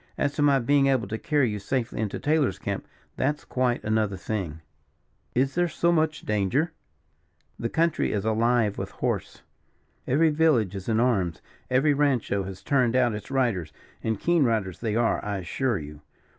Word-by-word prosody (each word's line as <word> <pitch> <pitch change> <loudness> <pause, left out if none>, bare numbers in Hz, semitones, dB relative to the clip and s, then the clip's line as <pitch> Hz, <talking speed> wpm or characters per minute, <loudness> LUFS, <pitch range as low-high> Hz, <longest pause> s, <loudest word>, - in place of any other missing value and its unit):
As 145 0 0
to - - -2
my 145 -1 +5
being 135 +2 +3
able 130 -6 +1
to 110 - -3
carry 145 -6 +1
you 105 - -4
safely 115 +3 -2
into 105 -3 -2
Taylor's 145 - +1
camp, - - -4 0.3
that's 145 +3 -1
quite 125 -1 0
another 110 -2 0
thing." 90 -6 -4 0.7
"Is 135 +2 +2
there 175 0 +2
so 170 +2 +1
much 155 -2 +1
danger?" 105 - 0 0.9
"The 115 - -2
country 165 +3 +1
is 105 -1 -2
alive 110 -1 +2
with - - -4
horse. - - -3 0.6
Every 155 +4 +3
village 150 - +2
is 95 +2 -6
in 110 0 +2
arms, 100 -10 +1 0.3
every 135 +4 +3
rancho 135 -8 +1
has 95 0 -8
turned 130 -5 +2
out 125 -3 +3
its 105 - -7
riders; 115 - 0 0.3
and 110 -2 -1
keen 170 -3 +3
riders 110 -7 0
they 110 -2 -2
are, 115 0 +1
I 105 -1 -2
assure 110 +6 -1
you. 75 -1 -9
120 Hz, 170 wpm, -26 LUFS, 105-140 Hz, 0.9 s, my